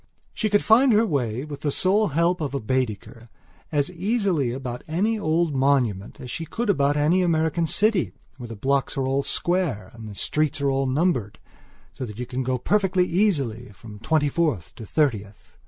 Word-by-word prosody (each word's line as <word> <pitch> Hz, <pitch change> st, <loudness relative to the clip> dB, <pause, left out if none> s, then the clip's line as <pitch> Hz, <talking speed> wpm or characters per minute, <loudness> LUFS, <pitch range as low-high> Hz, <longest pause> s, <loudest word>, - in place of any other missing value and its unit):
She 215 Hz, -, -1 dB
could 205 Hz, 0 st, +2 dB
find 245 Hz, +4 st, +5 dB
her 220 Hz, +2 st, +4 dB
way, 130 Hz, -, -1 dB
with 145 Hz, -2 st, -8 dB
the 150 Hz, -, 0 dB
sole 195 Hz, +8 st, +2 dB
help 170 Hz, +3 st, +1 dB
of 140 Hz, -5 st, -3 dB
Baedeker, 115 Hz, -2 st, -3 dB, 0.4 s
as 145 Hz, +1 st, 0 dB
easily 185 Hz, -, 0 dB
about 125 Hz, -1 st, -5 dB
any 205 Hz, +8 st, 0 dB
old 165 Hz, -3 st, +1 dB
monument 130 Hz, -8 st, 0 dB
as 125 Hz, -, -8 dB
she 165 Hz, -, -4 dB
could 225 Hz, +7 st, -1 dB
about 145 Hz, -4 st, +1 dB
any 160 Hz, +6 st, +3 dB
American 165 Hz, -1 st, +1 dB
city 210 Hz, +1 st, +2 dB, 0.3 s
where 125 Hz, -3 st, -8 dB
the 115 Hz, -, -7 dB
blocks 135 Hz, +6 st, 0 dB
are 135 Hz, -, 0 dB
all 135 Hz, +1 st, +1 dB
square 155 Hz, -, -1 dB
and 115 Hz, -2 st, -9 dB
the 100 Hz, -, -9 dB
streets 150 Hz, +8 st, 0 dB
all 135 Hz, -1 st, +1 dB
numbered, 130 Hz, -, 0 dB, 0.6 s
so -, -, -7 dB
that 105 Hz, -1 st, -9 dB
you 125 Hz, -, -4 dB
can 125 Hz, +1 st, -4 dB
go 130 Hz, 0 st, -1 dB
perfectly 190 Hz, -, +1 dB
easily 145 Hz, -, 0 dB
from 105 Hz, +1 st, -12 dB
Twenty 155 Hz, +4 st, +1 dB
fourth 145 Hz, -, -1 dB
to 110 Hz, -, -9 dB
Thirtieth. 105 Hz, -10 st, -2 dB
145 Hz, 180 wpm, -24 LUFS, 125-175 Hz, 0.6 s, find